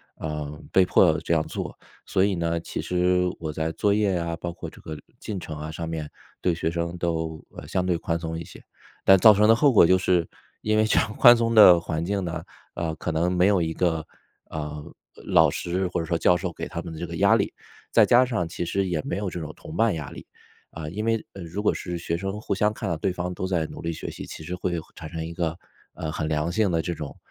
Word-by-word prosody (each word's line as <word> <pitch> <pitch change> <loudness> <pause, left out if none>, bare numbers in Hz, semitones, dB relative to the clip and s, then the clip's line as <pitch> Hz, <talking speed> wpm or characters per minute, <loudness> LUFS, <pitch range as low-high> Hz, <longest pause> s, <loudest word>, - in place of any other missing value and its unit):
呃， 75 -2 -4 0.2
被 95 - +5
迫 90 -3 +4
这 - - -1
样 80 -1 +2
做， - - -6 0.3
所 95 - +2
以 100 -1 +2
呢， 85 -1 -1
其 - - -5
实 90 0 +1
我 80 -2 -4
在 80 +1 -2
作 100 +3 +2
业 100 -2 +2
呀， 85 -1 -2
包 85 -1 -4
括 - - -7
这 - - -16
个 80 -1 -7 0.2
进 105 - -5
程 80 -4 -6
啊 75 +1 -5
上 80 +1 -5
面， 80 -2 -4 0.3
对 90 -2 +1
学 80 0 -1
生 85 +1 -3
都， 80 -2 -2
呃， - - -8
相 90 -1 -1
对 90 -2 +1
宽 80 0 -2
松 80 0 -4
一 85 - -7
些， - - -13 0.4
但 95 - +7
造 110 +3 +8
成 105 +1 +3
的 - - +9
后 140 +1 +4
果 100 - +7
就 95 +2 +5
是 90 -2 +2 0.4
因 110 0 +1
为 110 - +4
这 110 - +2
样 110 - -3
宽 120 0 +9
松 115 0 0
的 90 -6 +8
环 80 0 -3
境 100 +1 -1
呢， 85 -2 -4 0.3
呃， 80 -2 -2
可 80 - -3
能 80 +2 +1
没 90 +1 +3
有 100 -3 +3
一 80 -1 -1
个， 80 -3 0 0.4
呃， 75 -1 -5 0.4
老 80 -2 +5
师 90 +5 -2
或 90 - -2
者 80 - -2
说 85 +1 0
教 90 +1 +4
授 90 -1 -4
给 - - -5
他 85 - -4
们 85 -1 -8
的 - - -8
这 85 - -4
个 85 0 -6
压 - - +5
力， - - 0 0.4
再 - - +6
加 125 +2 +5
上 115 -9 -1
其 85 - -4
实 95 +3 -1
也 85 -4 -1
没 90 - -3
有 100 -1 -2
这 90 - -7
种 75 -1 -6
同 80 - -10
伴 115 -1 +3
压 75 -2 -6
力。 - - -10 0.5
啊， 80 -1 -7
因 105 +6 -4
为 115 0 0
如 95 +2 -6
果 - - +3
是 90 -2 -4
学 85 0 -2
生 95 +4 -4
互 105 - -2
相 105 +2 +2
看 105 -1 -5
到 85 - 0
对 85 +4 -1
方 90 0 -4
都 95 - -3
在 85 -4 0
努 - - -9
力 85 - -2
学 80 - -6
习， - - -8
其 - - -9
实 90 +3 -5
会 90 -1 -2 0.2
产 80 - -8
生 80 +1 -5
一 85 - -6
个， 85 -1 -2 0.4
呃， 80 - -4
很 75 0 -3
良 75 +2 0
性 105 +3 +2
的 85 -2 +1
这 85 +1 -2
种， 75 -4 -7
85 Hz, 275 characters per minute, -25 LUFS, 80-95 Hz, 0.5 s, 的